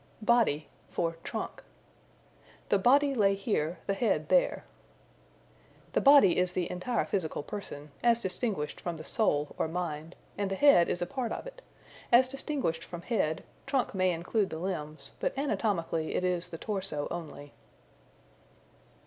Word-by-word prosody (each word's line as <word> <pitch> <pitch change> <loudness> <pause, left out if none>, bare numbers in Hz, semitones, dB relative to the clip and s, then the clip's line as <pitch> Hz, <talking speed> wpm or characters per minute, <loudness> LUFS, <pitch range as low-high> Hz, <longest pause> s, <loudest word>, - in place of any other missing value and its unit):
Body 215 -11 +3 0.2
for 165 -1 -2
Trunk. - - -5 1.1
"The 200 - +4
body 280 +6 +4
lay 200 -5 +3
here, 185 -5 -1
the 195 - 0
head 225 +3 0
there." - - +2 1.3
The - - +2
body 275 -12 +7
is 180 0 +1
the 180 -2 -1
entire 205 +7 -1
physical 160 -6 -2
person 150 -5 -7
(as 235 -1 +4
distinguished 190 -6 -3
from 170 -2 -4
the 155 - -8
soul, 150 -7 0
or - - +1
mind) 160 -1 -4 0.2
and 200 -1 0
the 195 - -1
head 235 -8 +6
is 175 - -1
a - - -1
part 240 +4 -3
of - - -4
it. - - -10 0.5
As 250 +2 +7
distinguished 265 - -2
from 175 -1 -8
head, 165 -9 0 0.2
trunk 270 -2 0
may 185 -1 +2
include 180 +4 0
the 160 - -5
limbs, 160 -4 -5
but - - -2
anatomically 185 - -1
it - - 0
is 180 -1 0
the 165 - -7
torso 190 -7 -2
only. 155 -4 -7
185 Hz, 150 wpm, -30 LUFS, 165-235 Hz, 1.3 s, body